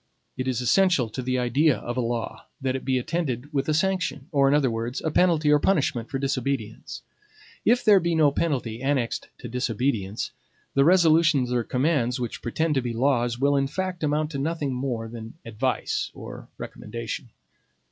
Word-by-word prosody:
It 130 0 -3
is 125 -1 0
essential 140 -1 +3
to 130 - -5
the 130 0 -1
idea 135 +4 +3
of 120 - -5
a 130 - 0
law, 115 -1 -3
that 130 -1 -1
it 135 - -4
be 130 -1 +1
attended 145 -1 -3
with 135 +1 0
a - - +3
sanction; 180 -5 0
or, 140 -3 +4
in 140 - +4
other 135 -5 +2
words, 115 +3 -3
a 160 - -1
penalty 160 -3 +3
or 150 - +5
punishment 140 -10 +1
for 135 - -2
disobedience. 135 -4 -3 0.6
If 245 +1 +3
there 205 -3 +7
be 170 -1 0
no 155 -3 +4
penalty 125 -7 -1
annexed 135 -4 -1
to - - -8
disobedience, 115 -4 -1 0.4
the 140 - +4
resolutions 160 -7 +4
or 120 -1 +1
commands 125 -1 0
which 120 -2 -4
pretend 155 +7 0
to 135 - +1
be 120 -1 -3
laws 120 -1 +1
will, 140 +2 +2
in 135 -1 +2
fact, 185 +2 -3
amount 150 +1 0
to 140 - -3
nothing 145 -2 -1
more 125 -3 -3
than 115 +1 -9
advice 120 +3 -1
or - - -9
recommendation. 115 +1 -6
135 Hz, 180 wpm, -25 LUFS, 120-155 Hz, 0.6 s, there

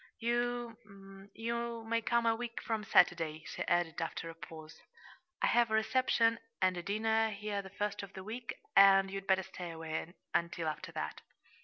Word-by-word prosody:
You 230 -5 -3
you 235 0 -3
may 230 +1 0
come 235 +1 +1
a 225 0 +4
week 235 0 -5
from 220 -2 -2
Saturday," 165 -6 +3
she - - -6
added, 175 -2 +1
after 165 0 -4
a - - -11
pause. 160 -1 -11 0.6
"I - - +6
have 240 -1 +4
a 220 - +2
reception 230 0 +3 0.2
and 185 -1 +3
a 175 - -3
dinner 220 +3 +1
here 205 -1 -3
the 190 - -10
first 205 +1 -2
of 200 0 -9
the 190 - -8
week, 230 +4 -5 0.2
and 195 -1 +7
you'd 195 0 -5
better 190 0 +3
stay 180 -1 -7
away 160 0 -4 0.2
until 170 -1 0
after 155 - -6
that." - - -4
205 Hz, 175 wpm, -33 LUFS, 180-230 Hz, 0.6 s, and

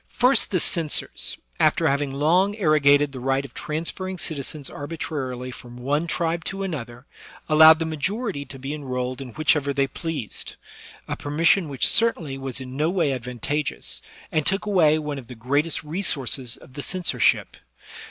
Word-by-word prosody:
First, 250 +2 +2
the 185 - +1
censors, 160 -2 0 0.2
after - - +3
having 140 0 0
long 175 +9 +2
arrogated 145 -6 +4
the 130 - -7
right 135 +2 0
of 130 - -12
transferring 175 +4 -4
citizens 145 -3 -2
arbitrarily 135 -4 -5
from 120 0 -11
one 145 +6 -1
tribe 165 0 -1
to 195 0 -3
another, 125 -8 -6 0.4
allowed 155 +1 +8
the 165 - -2
majority 160 - -2
to 135 0 -10
be 135 +2 -5
enrolled 130 -3 -3
in 125 -4 -8
whichever 150 -2 +2
they 140 0 +2
pleased 145 -4 -5 0.3
— - - -18
a - - -2
permission 165 +4 +2
which 135 -3 +3
certainly 180 -12 +2
was 135 -1 -4
in 130 0 -8
no 155 +3 +1
way 170 -6 +1
advantageous, 125 +4 -3 0.3
and 155 - +1
took 195 +2 +1
away 170 -7 +4
one 150 -2 -4
of 125 - -13
the 125 - -9
great 140 +9 0
re 160 +6 -3
sources 130 -7 0
of 130 - -17
the 145 - -5
censorship. 180 +3 +1
145 Hz, 165 wpm, -24 LUFS, 135-165 Hz, 0.4 s, allowed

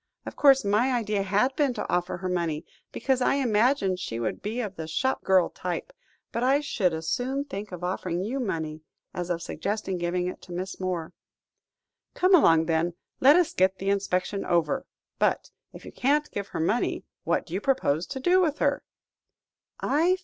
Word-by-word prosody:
Of - - -7
course, 270 -4 +5
my 215 +6 +2
idea 215 -4 0
had 210 +7 +1
been 280 -5 +1
to - - -3
offer 175 0 -1
her 185 +1 -4
money, 170 -3 -1 0.3
because 265 -1 0
I 250 - +3
imagined 225 -6 +2
she 115 -11 -4
would 115 - -3
be 220 +4 -3
of 210 -5 -3
the 160 -2 -6
shop 260 +12 -1
girl 190 -2 +3
type, - - -4 0.4
but 235 - -2
I 265 +3 +4
should 240 -11 0
as 160 0 -5
soon 260 - -1
think 205 -7 -6
of 180 -1 -7
offering 180 -1 -2
you 250 +7 -2
money, 160 -9 -3 0.3
as 175 0 -4
of 170 -1 -2
suggesting 200 -2 -3
giving 175 +1 -1
it 180 - -5
to 180 - -13
Miss 185 +2 -5
Moore." 180 -3 -3 1.0
"Come 370 +1 +3
along, 165 - +6
then; 165 +1 0 0.2
let 280 +3 +7
us 355 -2 +3
get 190 +1 +2
the 195 +1 0
inspection 195 0 -1
over. 175 +11 0 0.3
But, - - +1 0.2
if - - -12
you - - -8
can't 295 +3 +1
give 200 -1 -4
her - - -5
money, 210 +9 0 0.2
what - - 0
do 170 - -10
you 190 - -1
propose 180 - +1
to 270 - -5
do 360 +7 +4
with 310 -4 +1
her?" - - +1
195 Hz, 185 wpm, -27 LUFS, 175-260 Hz, 1.0 s, let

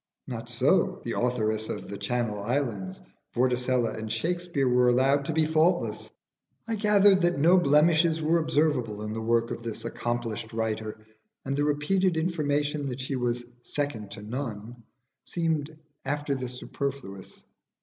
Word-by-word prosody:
Not - - -6
so - - +2
the - - -2
authoress 110 -3 0
of - - -5
'The 100 - -7
Channel 120 -4 -1
Islands:' 105 -6 -2 0.4
Vorticella 125 -1 +1
and 110 0 -5
Shakspere 170 +3 -1
were 125 0 +4
allowed 135 +3 +3
to - - -1
be 160 0 +2
faultless. 160 +3 +1 0.6
I 230 - -1
gathered 205 -2 +5
that 175 -2 +2
no 170 +6 +6
blemishes 160 +2 +4
were 160 +2 +2
observable 145 -9 0
in 105 0 -4
the 110 - -3
work 115 +1 +1
of - - -4
this 115 -1 -5
accomplished 120 -1 -3
writer, 110 -1 -3 0.4
and 135 +1 -1
the 145 +1 +1
repeated 165 +5 +1
information 150 -3 0
that 125 -1 -4
she 130 +1 -3
was 120 -1 -1 0.2
"second 125 -8 -3
to 105 - -9
none" 115 -1 -5 0.4
seemed 160 -3 -2 0.3
after 145 +1 -1
this 125 -2 -4
superfluous. 135 -10 -6
130 Hz, 150 wpm, -27 LUFS, 115-155 Hz, 0.6 s, no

